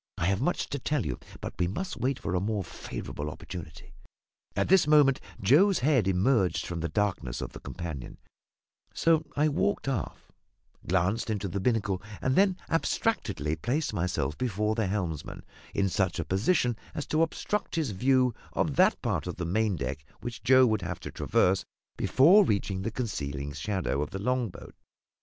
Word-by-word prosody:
I 85 - 0
have 95 +3 +1
much 175 +6 0
to 140 - -3
tell 145 -1 -1
you; 60 - -3 0.2
but - - -5
we 90 - +2
must 185 - -4
wait 130 +1 -1
for 100 - -4
a 90 - +2
more 105 0 -1
favourable 75 -2 -6
opportunity." 80 -1 -9 0.6
At - - +1
this 190 -4 +5
moment 145 -3 +5 0.2
Joe's 165 - +5
head 130 -10 +3
emerged 95 +1 +2
from 85 -1 -4
the 80 0 -2
darkness 95 - -1
of - - -5
the - - -8
companion; 80 -8 -6 0.8
so 160 -1 +3
I 150 +1 +3
walked 155 +3 0
aft, 130 -8 -3 0.6
glanced 95 +6 +1
into 105 -2 -1
the 100 +2 -3
binnacle, 100 -3 0 0.2
and 130 0 0
then 190 -1 +4
abstractedly 105 - 0
placed 125 - -1
myself 85 -7 -1
before 105 -3 0
the 110 -2 0
helmsman 90 -7 -3 0.3
in 100 - +2
such 95 -2 0
a 85 - -2
position 120 - +1 0.2
as 150 - -3
to 155 - +1
obstruct 185 +5 -1
his 160 -8 0
view 125 +4 +3 0.2
of - - 0
that - - +5
part - - -1
of - - -4
the 90 - -4
maindeck 85 - -1 0.2
which 120 -3 -6
Joe 130 +3 +6
would 110 -4 +1
have 85 -1 -4
to - - -6
traverse 95 +1 +2 0.3
before 180 +11 +6
reaching 100 - 0
the 100 - -2
concealing 70 - -4
shadow 95 -5 -1
of 75 - -2
the 95 - -5
long 125 +2 0
boat. - - -12
105 Hz, 175 wpm, -28 LUFS, 90-135 Hz, 0.8 s, Joe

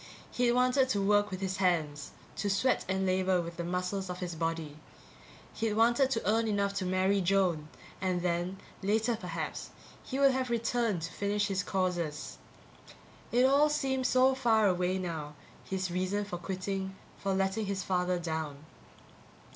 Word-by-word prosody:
He'd 245 -1 +2
wanted 255 +1 +3
to 205 - +1
work 205 +1 +3
with 185 -1 -5
his 190 0 -2
hands, 160 -6 0 0.3
to 205 - -1
sweat 250 +6 +2
and 190 0 0
labor 185 0 +2
with 170 0 -5
the 170 - -2
muscles 180 +2 -2
of 180 - -4
his 180 -1 -4
body. 165 -2 -3 0.8
He'd 225 -1 -1
wanted 240 +4 +4
to 230 -4 -1
earn 225 +2 +2
enough 200 -1 0
to 185 -2 -1
marry 190 +2 +2
Joan 180 -4 +1 0.3
and 180 -2 0
then, 175 +2 -1 0.2
later 220 +4 +1
perhaps, 170 -7 -5 0.3
he 265 - -4
would 275 -1 +5
have 260 -1 -1
returned 230 -5 0
to 165 - -5
finish 205 +1 0
his 195 0 0
courses. 180 -5 -2 0.9
It 245 +2 +4
all 285 +3 +5
seemed 265 -3 0
so 260 +1 +4
far 230 -5 +3
away 180 0 +1
now, 160 -5 -4 0.3
his 185 -1 -2
reason 185 +3 -1
for 180 -3 -5
quitting, 190 +1 -3 0.2
for 195 -1 -1
letting 195 +2 0
his 195 -1 -2
father 180 -1 0
down. 160 -3 -4
190 Hz, 165 wpm, -31 LUFS, 180-220 Hz, 0.9 s, would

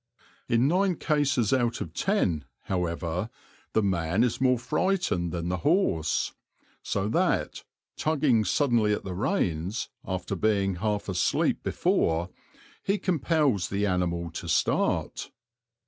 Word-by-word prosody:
In 120 +2 +3
nine 185 +3 +2
cases 145 -8 +1
out 120 -3 +1
of 80 - -6
ten, 90 - 0 0.2
however, 90 +1 -2 0.4
the 110 - +3
man 90 +1 +1
is 125 0 -1
more 125 -1 +4
frightened 130 - 0
than 85 -1 -3
the 90 - 0
horse, 145 - +1 0.5
so 100 0 -1
that, - - 0 0.3
tugging 140 -7 +2
suddenly 115 -1 +2
at - - -3
the 95 - -5
reins, 95 - -1
after 95 +1 -3
being 100 -1 +1
half 105 +2 -1
asleep 90 -3 +1
before, 85 +3 0 0.5
he 200 +1 0
compels 155 - +1
the 100 +1 0
animal 85 -3 -1
to 85 - -6
start. - - 0
105 Hz, 125 wpm, -27 LUFS, 90-135 Hz, 0.5 s, more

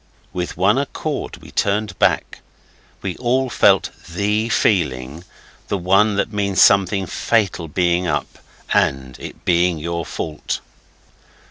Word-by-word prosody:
With 90 -1 -4
one 100 +7 +3
accord 145 +1 -4
we - - -12
turned 100 -1 -1
back. - - +1 0.6
We 95 -2 -3
all 130 +1 0
felt - - +4 0.2
THE 105 +5 0
feeling 75 - 0 0.4
the 100 - -1
one 100 +4 +3
that 100 +2 -1
means 100 -2 0
something 100 0 +5
fatal 100 -4 0
being 90 +2 +1
up 75 -2 -3 0.3
and 65 -2 +1
it - - -10
being 85 -1 +3
your 85 +2 -3
fault. 75 0 -4
95 Hz, 125 wpm, -20 LUFS, 85-105 Hz, 0.6 s, something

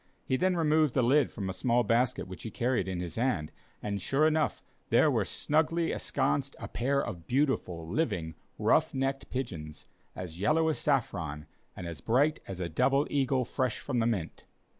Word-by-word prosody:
He 130 - +1
then 185 +7 +2
removed 155 -3 +3
the 130 - +3
lid 140 +5 +4
from 100 -4 -4
a 95 - -2
small 120 +5 +2
basket 115 -3 +1
which 95 0 -9
he 115 - -5
carried 120 -3 0
in 95 -2 -3
his 85 -2 -5
hand, 115 -11 0 0.3
and 100 -1 -2
sure 135 +11 +2
enough, 155 -1 +1 0.3
there - - +5
were - - +1
snugly 160 +2 +1
ensconced 140 0 -1
a - - -5
pair 140 +3 0
of 85 -2 -7
beautiful, 120 - 0
living 90 - -1 0.2
ruff - - +2
necked 135 +1 -1
pigeons, 80 - -5 0.3
as 90 -2 -7
yellow 160 +9 +3
as 155 - -1
saffron, 80 - -1 0.3
and 90 - -7
as 85 -2 -6
bright 140 +7 +2
as 95 -2 -6
a 90 - -2
double 135 - +2
eagle 135 -2 +1
fresh 130 -1 -1
from 130 -4 -2
the 115 - +2
mint. 100 -9 -3
125 Hz, 180 wpm, -30 LUFS, 90-140 Hz, 0.3 s, there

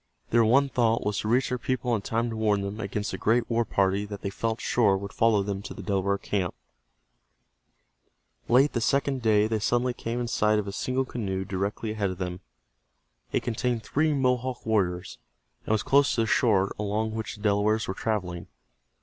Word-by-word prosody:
Their 115 0 +5
one 135 +6 +4
thought 115 -4 +1
was 105 -1 0
to - - -3
reach 125 +4 +2
their 125 - -2
people 125 -1 -1
in 110 - 0
time 115 +3 -1
to - - -4
warn 105 -2 +1
them 100 +2 -5
against 105 0 -3
the - - -5
great 115 +2 +2
war 120 0 +1
party 100 -1 +1
that 100 -1 -8
they 100 - -2
felt 115 +2 -2
sure 105 -5 +2
would 100 +1 -7
follow 110 -3 +3
them 100 -1 -3
to - - -8
the - - -8
Delaware 100 -1 0
camp. 95 -3 -2 1.9
Late 135 +5 +5
the 120 - -1
second 135 +1 +1
day 105 -2 +4
they 110 0 0
suddenly 120 +3 +1
came 115 0 -4
in 120 - -2
sight 105 -2 +2
of 105 -1 -2
a - - -3
single 130 +6 -1
canoe 95 -6 -3
directly 100 +4 -3
ahead 105 -2 -1
of 95 - -5
them. 90 -1 -4 0.9
It - - 0
contained 120 0 -1
three 155 +2 +1
Mohawk 130 -2 0
warriors, 95 -5 -1 0.5
and - - -1
was 110 -1 +2
close 140 +1 +3
to 115 - +2
the - - +2
shore 105 -4 +2
along 105 +1 -1
which 110 0 -4
the 105 - -14
Delawares 105 +1 +2
were 95 - -2
traveling. 95 -6 -3
110 Hz, 200 wpm, -27 LUFS, 100-120 Hz, 1.9 s, Their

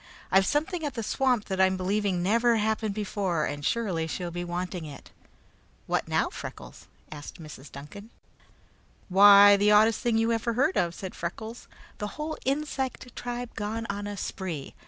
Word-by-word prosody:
I've 190 +1 +4
something 315 +3 -1
at 290 -3 -3
the 230 - -3
swamp 250 -1 +1
that 190 -1 -1
I'm 190 0 +3
believing 190 -1 0
never 230 +5 +3
happened 220 -1 0
before, 195 -6 -1
and 145 0 -5
surely 185 -6 0
she'll 175 +2 -4
be 175 +1 -4
wanting 175 0 -4
it." 145 -2 -11 0.7
"What - - -1
now, - - +1
Freckles?" - - -9 0.2
asked 145 +2 -9
Mrs. 150 -3 -11
Duncan. 200 +10 -10 1.0
"Why, 200 +1 +9
the 205 +1 +3
oddest 215 +1 +5
thing 235 -3 +1
you 225 +1 +2
ever 230 +1 0
heard 275 +10 +2
of," 170 -1 0
said 190 -2 -7
Freckles; 220 +7 -6 0.3
"the 210 0 -5
whole 310 +1 -3
insect 270 -3 -2
tribe 245 0 -5
gone 220 +2 -3
on 205 0 -5
a 205 0 -5
spree. 175 -9 -5
205 Hz, 165 wpm, -27 LUFS, 180-230 Hz, 1.0 s, Why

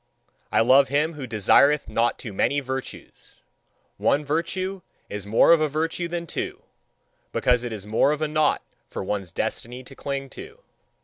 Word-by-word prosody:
I - - +4
love 130 +4 +6
him 150 +4 +1
who 140 -4 -7
desireth 135 +7 +4
not 120 +1 +1
too 110 -5 -8
many 140 +8 +1
virtues. 130 -1 -7 0.6
One 145 +1 +1
virtue 185 +5 -2 0.3
is 100 -1 -6
more 110 +9 +5
of 165 -2 +6
a 155 - +2
virtue 165 +3 -2
than 170 0 -4
two, 380 - -5 0.7
because 125 -1 +2
it 120 - -4
is 105 -3 -6
more 110 +6 +2
of 150 +1 -1
a - - +1
knot 155 0 +1 0.2
for - - -5
one's 95 -3 -3
destiny 125 +8 -4
to 135 +2 -13
cling 135 0 -4
to. 445 +5 -11
140 Hz, 170 wpm, -24 LUFS, 120-165 Hz, 0.7 s, love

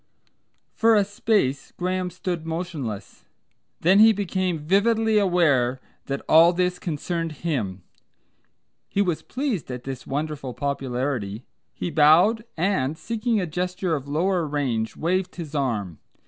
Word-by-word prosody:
For 225 0 +4
a 205 -2 +4
space 205 - 0
Graham 185 0 -1
stood 180 -2 -4
motionless. 160 - -5 0.6
Then 185 +4 +5
he 220 +1 +8
became 185 -3 -1
vividly 215 +7 +2
aware 145 -10 +2 0.3
that 140 0 -3
all 165 +2 +7
this 180 0 0
concerned 165 0 -3
him. 105 - -2 1.1
He 200 - +1
was 175 -5 -1
pleased 255 - -3
at 125 -1 -6
his 135 -2 -6
wonderful 145 -3 -3
popularity, 125 -5 -3 0.3
he 175 - -4
bowed, 165 +10 +5
and, 160 -5 0
seeking 230 +1 -1
a 185 - -1
gesture 180 +2 -2
of 140 -2 -6
longer 170 +3 0
range, 125 -7 -1
waved 180 +3 -1
his 160 -4 -7
arm. 110 - -2
165 Hz, 130 wpm, -24 LUFS, 140-185 Hz, 1.1 s, he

